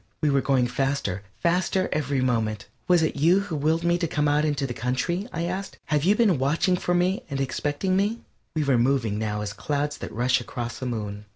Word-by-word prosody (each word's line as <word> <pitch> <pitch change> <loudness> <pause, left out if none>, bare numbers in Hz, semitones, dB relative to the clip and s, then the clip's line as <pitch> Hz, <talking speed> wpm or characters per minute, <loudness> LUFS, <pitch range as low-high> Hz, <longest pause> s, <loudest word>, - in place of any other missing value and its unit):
We 150 -2 +3
were 140 -1 +3
going 130 -3 +2
faster, 135 -7 -1 0.2
faster 185 +2 +2
every 140 -3 0
moment. 110 -5 0 0.2
"Was 175 -2 +4
it 160 - -1
you 170 +7 +4
who 180 -5 -4
willed 155 +3 +1
me 170 0 +2
to 170 - 0
come 150 -2 0
out 150 +1 +2
into 145 -2 0
the 125 - -4
country?" 130 - -1
I 165 - -3
asked. 190 +3 -4
"Have 150 -2 +1
you 200 +3 +5
been 210 - +3
watching 155 +7 +2
for 175 0 0
me 180 +2 +1
and 140 -2 -3
expecting 145 +7 -1
me?" 205 +4 0 0.3
We 155 - +1
were 135 -4 +3
moving 120 -4 +1
now 105 -1 -2
as 105 -1 -4
clouds 145 +5 -2
that - - -6
rush 125 +2 +1
across 120 0 -5
a 130 - -2
moon. 105 -3 -4
145 Hz, 215 wpm, -25 LUFS, 125-170 Hz, 0.3 s, you